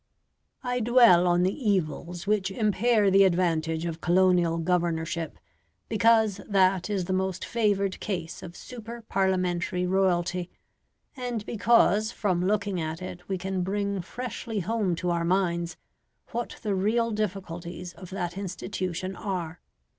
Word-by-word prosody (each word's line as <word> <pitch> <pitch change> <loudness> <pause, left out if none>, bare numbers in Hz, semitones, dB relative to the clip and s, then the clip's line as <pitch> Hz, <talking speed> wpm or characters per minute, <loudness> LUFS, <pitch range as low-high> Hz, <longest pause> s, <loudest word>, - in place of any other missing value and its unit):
I 250 0 -1
dwell 230 -7 +6
on 175 0 +3
the 185 +2 +2
evils 175 - -1
which 200 -2 +1
impair 210 +1 +2
the 195 +1 +7
advantage 165 -3 +1
of 165 -1 -4
colonial 175 -2 +3
governorship 165 -2 -1 0.5
because 220 -2 +3
that 190 -1 +3
is 195 -4 -1
the 185 - -2
most 190 -1 -1
favoured 200 -4 0
case 175 -6 -4
of 175 -1 -9
super 235 -1 -9
Parliamentary 180 -3 0
royalty, 180 -1 +1 0.7
and 245 -5 -4
because 220 -1 +3
from 180 -4 0
looking 200 -2 0
at 160 +1 -3
it 180 0 -8
we 190 - 0
can 190 0 -2
bring 200 +1 -1
freshly 225 +1 -5
home 200 -2 0
to 175 +1 -1
our 170 -1 0
minds 170 -1 0 0.5
what 240 0 -4
the 210 -2 0
real 225 +5 +1
difficulties 180 -4 -4
of 185 - -11
that 185 -1 -4
institution 185 -1 -4
are. 180 -5 -4
190 Hz, 135 wpm, -27 LUFS, 175-210 Hz, 0.7 s, the